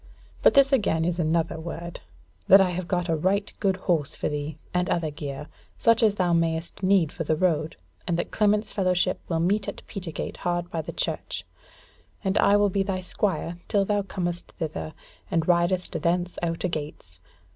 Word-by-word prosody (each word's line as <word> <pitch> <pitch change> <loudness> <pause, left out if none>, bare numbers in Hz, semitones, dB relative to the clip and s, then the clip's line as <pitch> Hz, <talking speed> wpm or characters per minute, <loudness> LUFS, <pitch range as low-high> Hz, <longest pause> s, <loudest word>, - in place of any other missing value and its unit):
But - - +5
this 275 0 +6
again 165 -10 +2
is 175 0 -1
another 165 0 0
word, 170 +1 -6 0.5
that 195 - +9
I 190 -2 +3
have 180 0 -4
got 180 -2 0
a 165 - +1
right 190 +6 0
good 195 -2 +2
horse 170 -6 0
for - - -2
thee, 150 +1 -4 0.2
and 180 0 +1
other 165 -3 0
gear, 145 -2 -6 0.3
such 230 0 +4
as 215 -3 +4
thou 180 -3 +1
mayest 165 +1 0
need 185 -5 +3
for 180 - -4
the 155 0 +1
road, 160 -2 +1 0.3
and 170 -2 +1
that 175 - -3
Clement's 210 0 +2
fellowship 185 -1 +1
will 165 -2 0
meet 195 +5 +1
in - - -3
Petergate 175 -6 -5
hard 175 0 -2
by 165 - -1
the 155 - -6
church, - - -3 0.8
and 190 -1 0
I 205 - +5
will 205 0 +3
be 195 - +1
thy 190 -1 -1
squire 180 -2 -2
till 200 -1 +2
thou 205 0 +1
comest 175 -3 -4
thither, 80 - -5 0.3
and 165 -1 0
ridest 175 +1 +2
thence 175 +1 0
out 165 -1 -2
a - - +2
gates. 145 - -6
175 Hz, 190 wpm, -26 LUFS, 165-195 Hz, 0.8 s, that